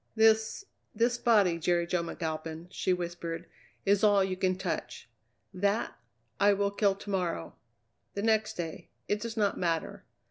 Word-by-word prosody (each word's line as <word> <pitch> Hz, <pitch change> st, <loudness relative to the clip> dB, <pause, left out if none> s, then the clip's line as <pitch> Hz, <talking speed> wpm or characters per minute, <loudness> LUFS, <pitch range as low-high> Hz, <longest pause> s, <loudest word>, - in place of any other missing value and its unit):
"This 220 Hz, -, +3 dB, 0.3 s
this 240 Hz, +2 st, +2 dB
body, 200 Hz, -8 st, +4 dB
Jerry 170 Hz, +1 st, +2 dB
Jo 175 Hz, 0 st, 0 dB
McAlpin," 160 Hz, 0 st, -5 dB
she 185 Hz, -, 0 dB
whispered, 175 Hz, -1 st, -3 dB, 0.4 s
"is 200 Hz, 0 st, +3 dB
all 205 Hz, -2 st, +5 dB
you 190 Hz, -1 st, -1 dB
can 185 Hz, 0 st, 0 dB
touch. 190 Hz, -, -4 dB, 0.5 s
That, 200 Hz, +4 st, 0 dB, 0.4 s
I 205 Hz, 0 st, +6 dB
will 200 Hz, 0 st, +1 dB
kill 200 Hz, -1 st, +2 dB
to 200 Hz, -, -10 dB
morrow 175 Hz, -, -2 dB, 0.6 s
the 200 Hz, -, -2 dB
next 220 Hz, -1 st, +2 dB
day 165 Hz, -2 st, -6 dB, 0.2 s
it 210 Hz, 0 st, 0 dB
does 230 Hz, -1 st, -5 dB
not 205 Hz, -2 st, +1 dB
matter. 165 Hz, -2 st, -1 dB
190 Hz, 150 wpm, -30 LUFS, 170-210 Hz, 0.6 s, I